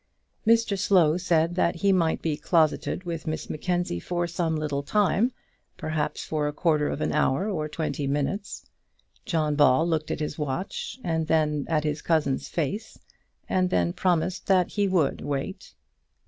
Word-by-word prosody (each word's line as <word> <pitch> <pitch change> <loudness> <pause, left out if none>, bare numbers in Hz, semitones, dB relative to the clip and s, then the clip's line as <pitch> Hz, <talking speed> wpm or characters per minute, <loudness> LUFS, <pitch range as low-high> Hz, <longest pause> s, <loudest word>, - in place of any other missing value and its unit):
Mr 225 -3 +3
Slow 170 -6 +4
said 170 -2 +1
that 175 -1 +1
he 195 +4 +2
might 165 -3 +1
be 160 -2 0
closeted 160 +3 +1
with 170 -2 -5
Miss 155 - -3
Mackenzie 175 - -1
for 175 - -2
some 170 -1 -1
little 150 -2 -2
time, 205 - +2 0.5
perhaps 155 -3 -2
for 150 -2 -1
a - - -1
quarter 150 -2 +1
of - - -4
an - - 0
hour 150 +5 +1
or 155 -7 -2
twenty 150 -2 -3
minutes. 145 +9 -2 0.6
John 155 -3 +1
Ball 145 +1 +4
looked 155 -2 -1
at - - -2
his 150 -1 -4
watch, 185 - -3
and 160 -2 -1
then 150 -2 +1
at 155 -2 +1
his 150 -1 -2
cousin's 150 -5 0
face, 200 +8 -3 0.5
and 185 -1 +1
then 85 - +1
promised 180 0 0
that 185 -2 +3
he 205 -1 0
would 180 -7 +1
wait. 140 -1 -4
160 Hz, 160 wpm, -26 LUFS, 150-180 Hz, 0.6 s, Slow